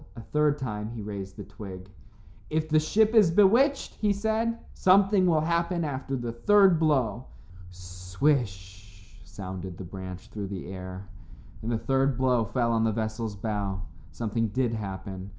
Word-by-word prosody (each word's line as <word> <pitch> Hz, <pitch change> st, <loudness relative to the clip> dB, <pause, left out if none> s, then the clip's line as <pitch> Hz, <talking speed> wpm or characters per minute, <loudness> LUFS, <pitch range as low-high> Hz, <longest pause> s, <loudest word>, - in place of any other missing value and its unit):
A 115 Hz, -, -8 dB
third 150 Hz, +3 st, +1 dB
time 105 Hz, -6 st, -4 dB
he 115 Hz, -2 st, -7 dB
raised 100 Hz, -2 st, -6 dB
the -, -, -6 dB
twig. 95 Hz, -3 st, -9 dB, 0.6 s
"If 155 Hz, 0 st, -1 dB
the 155 Hz, 0 st, +4 dB
ship 215 Hz, +8 st, +2 dB
is 215 Hz, -6 st, +6 dB
bewitched," 230 Hz, -, +4 dB
he 210 Hz, -2 st, +2 dB
said, 220 Hz, +3 st, 0 dB, 0.2 s
"something 190 Hz, 0 st, +4 dB
will 160 Hz, -3 st, +3 dB
happen 170 Hz, +2 st, 0 dB
after 135 Hz, -2 st, -3 dB
the 120 Hz, -2 st, -3 dB
third 190 Hz, -, +4 dB
blow." 130 Hz, -7 st, +1 dB, 0.4 s
"Swish" 95 Hz, +2 st, -3 dB
sounded 95 Hz, -3 st, -7 dB
the -, -, -7 dB
branch 95 Hz, 0 st, -8 dB
through 105 Hz, -2 st, -5 dB
the 95 Hz, -2 st, -6 dB
air, 95 Hz, +1 st, -8 dB, 0.5 s
and 115 Hz, -, -3 dB
the 115 Hz, -, +1 dB
third 135 Hz, +1 st, +1 dB
blow 125 Hz, -3 st, +2 dB
fell 120 Hz, +2 st, 0 dB
on 115 Hz, -1 st, +2 dB
the 110 Hz, -, +2 dB
vessel's 110 Hz, 0 st, -3 dB
bow. 100 Hz, -2 st, -3 dB, 0.3 s
Something 115 Hz, 0 st, -1 dB
did 120 Hz, +2 st, 0 dB
happen. 95 Hz, -2 st, -6 dB
115 Hz, 155 wpm, -27 LUFS, 100-155 Hz, 0.6 s, is